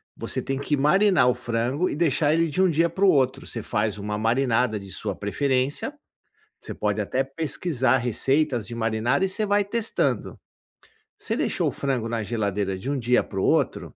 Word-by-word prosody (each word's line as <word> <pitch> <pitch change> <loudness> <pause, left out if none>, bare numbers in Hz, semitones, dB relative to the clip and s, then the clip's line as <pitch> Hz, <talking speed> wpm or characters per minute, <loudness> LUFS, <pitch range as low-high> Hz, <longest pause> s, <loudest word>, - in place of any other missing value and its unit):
você - - -3
tem 135 0 -3
que 145 +1 -1
marinar 180 +1 +4
o 125 - +4
frango 120 +11 -1
e - - -3
deixar 150 -1 +2
ele 165 +1 +2
de 155 +6 0
um 190 - +4
dia 165 +1 +2
para 190 +4 -3
o - - +6
outro. 130 -6 +2
Você 115 - -5
faz 105 -1 -1
uma 105 +1 -4
marinada 115 0 +1
de 100 -1 -11
sua 100 -1 -4
preferência, 130 - -1 0.7
você - - -7
pode 105 0 -1
até 130 +6 -1
pesquisar 135 -2 0
receitas 130 +1 +1
de 120 - -7
marinar 115 - 0
e - - +3
você 210 +3 -1
vai 205 0 +2
testando. 200 - -1 0.8
Você - - -2
deixou - - 0
o - - -5
frango 130 -5 -2
na 115 -1 -2
geladeira 100 -3 -2
de 95 +9 -5
um 145 - -1
dia 125 +1 +2
para 95 - -6
o - - 0
outro, - - 0
130 Hz, 195 wpm, -24 LUFS, 110-150 Hz, 0.8 s, o